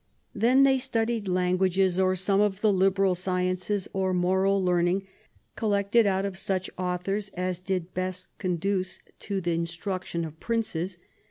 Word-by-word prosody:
Then 245 +6 +4
they 270 -1 +4
studied 225 -3 -1
lan 180 0 +1
guages, 190 -1 +2
or 185 0 +2
some 195 +2 +2
of 205 -1 0
the 215 -2 +4
liberal 195 0 +3
sciences, 185 +2 -1
or 190 -1 0
moral 190 +2 +2
learning 180 +2 +2 0.5
collected 205 +1 +2
out 190 0 +1
of 190 -1 -4
such 185 -1 -2
authors 185 +3 -2
as 180 0 -2
did 185 -1 -3
best 185 0 -3
conduce 185 0 -1 0.2
to 200 -2 -2
the 175 -1 -1
instruction 170 +1 -3
of 160 0 -10
Princes 195 -6 -2
190 Hz, 150 wpm, -27 LUFS, 180-200 Hz, 0.5 s, Then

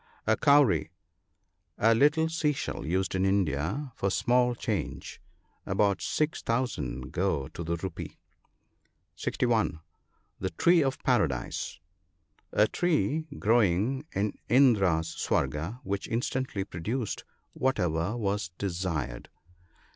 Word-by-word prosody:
(60.) - - +1
• - - +6
A - - 0
cowry. 140 -6 +4 0.4
— 85 0 -49
The 115 +2 +5
little 150 +6 +4
sea 160 -2 +1
shell 130 - -4
used 95 +2 0
in 95 0 +1
India 95 - 0
for 100 - 0
small 125 +4 +2
change. 75 - -4 0.4
About 100 0 +1
6,000 115 - -1
go 85 -7 0
to 85 - -7
the 85 +1 -1
rupee. 85 0 -6 1.0
(61.) 80 - 0 0.6
The 95 - -1
tree 170 - +4
of 135 -2 0
Paradise. 80 - 0 0.4
— 75 -3 -41
A 105 - +4
tree 160 -1 0
growing 115 - +2
in 100 +2 0 0.2
Indra's 100 -10 +4
Swarga, 85 +11 -1
which 100 0 -3
instantly 120 -2 -2
produced 105 +6 -4 0.3
whatever 95 -5 0
was 100 -5 -1
desired. 85 -10 -3
100 Hz, 115 wpm, -28 LUFS, 85-125 Hz, 1.0 s, •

